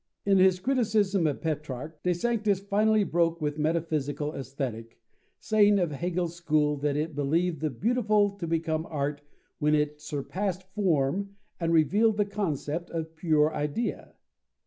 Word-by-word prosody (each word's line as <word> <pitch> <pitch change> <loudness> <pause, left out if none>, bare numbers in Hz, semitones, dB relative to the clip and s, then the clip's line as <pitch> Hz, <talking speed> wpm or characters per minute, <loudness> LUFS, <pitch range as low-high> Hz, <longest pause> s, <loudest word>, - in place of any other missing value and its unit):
In 195 -1 +4
his 185 -1 +5
criticism 210 -6 +1
of 145 - -2
Petrarch, 150 -1 -4
De 180 - +1
Sanctis 210 0 +1
finally 210 +2 +2
broke 170 -2 +1
with 150 -1 -2
metaphysical 150 -2 -1
Aesthetic, 130 -4 -5 0.4
saying 210 -1 +4
of 175 -5 0
Hegel's 175 +3 -2
school 155 -3 +1
that 145 0 -1
it 155 +1 -2
believed 160 +3 0
the 155 - 0
beautiful 210 - +2
to 170 -4 -4
become 160 -1 -1
art 145 -1 -2 0.4
when 150 0 +3
it 150 0 -1
surpassed 180 +6 -3
form 195 0 0 0.2
and 165 -1 0
revealed 205 +8 +3
the 205 - +2
concept 175 -5 -3
or 165 -1 -2
pure 160 -1 +1
idea. 150 +11 -3
165 Hz, 145 wpm, -28 LUFS, 150-200 Hz, 0.4 s, his